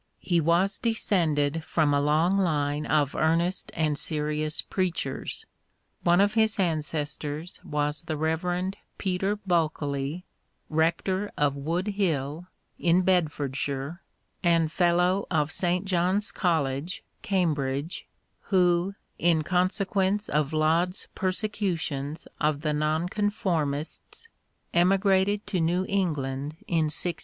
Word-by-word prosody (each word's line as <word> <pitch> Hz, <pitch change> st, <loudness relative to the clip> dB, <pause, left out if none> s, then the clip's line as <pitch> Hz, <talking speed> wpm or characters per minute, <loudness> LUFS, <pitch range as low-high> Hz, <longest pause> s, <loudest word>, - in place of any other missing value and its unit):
He 175 Hz, -2 st, +1 dB
was 180 Hz, +6 st, +2 dB
de 230 Hz, -1 st, 0 dB
scended 160 Hz, -7 st, +1 dB
from 155 Hz, -2 st, +1 dB
a 140 Hz, -, +3 dB
long 155 Hz, +6 st, +3 dB
line 150 Hz, -4 st, 0 dB
of 145 Hz, -2 st, +2 dB
earnest 165 Hz, +3 st, +1 dB
and 155 Hz, -3 st, 0 dB
serious 150 Hz, 0 st, 0 dB
preachers. 175 Hz, -8 st, -2 dB, 0.6 s
One 175 Hz, +1 st, +4 dB
of 205 Hz, +1 st, +4 dB
his 220 Hz, -1 st, +3 dB
ancestors 155 Hz, -2 st, -2 dB
was 150 Hz, 0 st, -1 dB
the 155 Hz, -2 st, -3 dB
Rev. 175 Hz, +4 st, -1 dB, 0.2 s
Peter 190 Hz, +2 st, 0 dB
Bulkeley, 160 Hz, -4 st, -1 dB, 0.4 s
rector 170 Hz, +5 st, 0 dB
of 145 Hz, -1 st, +2 dB
Woodhill, 165 Hz, 0 st, -1 dB, 0.3 s
in 175 Hz, +2 st, +3 dB
Bedford 155 Hz, -7 st, +1 dB
shire, 140 Hz, +5 st, -3 dB, 0.4 s
and 165 Hz, -3 st, +3 dB
Fellow 180 Hz, +2 st, +2 dB
of 155 Hz, -3 st, +1 dB
St. 180 Hz, +1 st, 0 dB
John's 185 Hz, +2 st, +1 dB
College, 160 Hz, -1 st, -1 dB, 0.2 s
Cam 185 Hz, -5 st, +1 dB
bridge, 140 Hz, +3 st, -3 dB, 0.4 s
who, 180 Hz, 0 st, +2 dB, 0.2 s
in 165 Hz, -2 st, +3 dB
consequence 190 Hz, +3 st, 0 dB
of 150 Hz, -1 st, +1 dB
Laud's 165 Hz, +4 st, +1 dB
persecu 195 Hz, -1 st, -1 dB
tions 145 Hz, +2 st, -4 dB
of 150 Hz, -1 st, +1 dB
the 150 Hz, -1 st, 0 dB
Nonconformists, 165 Hz, -, -2 dB, 0.4 s
emigrated 195 Hz, +3 st, +3 dB
to 190 Hz, -4 st, -1 dB
New 175 Hz, +3 st, +1 dB
England 150 Hz, -6 st, -1 dB
in 165 Hz, -3 st, +2 dB
1634. 170 Hz, +3 st, +3 dB
170 Hz, 115 wpm, -27 LUFS, 150-185 Hz, 0.6 s, One